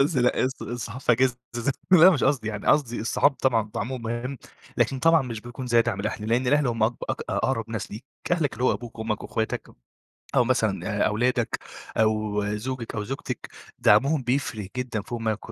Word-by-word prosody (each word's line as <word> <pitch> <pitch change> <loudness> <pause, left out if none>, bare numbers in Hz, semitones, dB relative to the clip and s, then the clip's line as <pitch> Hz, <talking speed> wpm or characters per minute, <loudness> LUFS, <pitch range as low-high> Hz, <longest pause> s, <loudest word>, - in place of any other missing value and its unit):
الص 130 -2 +1
الصحاب 120 0 -5
في 125 - +3
إجازة 125 +1 +2 0.2
از 120 +4 0 0.2
لأ 180 +1 +9
مش 160 - +1
قصدي 135 -5 +1
يعني، 105 -2 -5
قصدي 130 -7 +2
الصحاب 120 +5 +3
طبعًا 120 -5 +1
دعمهم 125 +3 -3
مهم، 120 +4 -3 0.4
لكن 135 - +1
طبعًا 165 +2 +5
مش 115 -4 -5
بيكون 120 +3 -7
زي 120 -1 +4
دعم 100 -3 -2
الأهل، 105 +1 -3
لأن 120 +3 +2
الأهل 145 +2 +3
هم 115 -2 -1
أق 115 +3 +3 0.2
أق - - -3
أقرب 115 -4 -1
ناس 115 -3 -4
ليك، 110 +5 -8 0.3
أهلك 160 -6 +1
اللي 120 +2 -2
هو - - +4
أبوك 115 -2 -7
أمك 110 -1 -2
وأخواتك 110 0 -3 0.7
أو 125 - +5
مثلًا 110 -5 0 0.2
آآ، - - +4
أولادك 120 +2 0 0.4
أو 110 -1 +1
زوجِك 120 +1 -5
أو 105 -1 -2
زوجتِك 135 +6 -5 0.3
دعمهم 135 +8 +4
بيفرق 120 -5 -1
جدًا 120 -4 -2
فوق 120 +3 -5
ما 110 -1 0
120 Hz, 185 wpm, -25 LUFS, 110-130 Hz, 0.7 s, لأ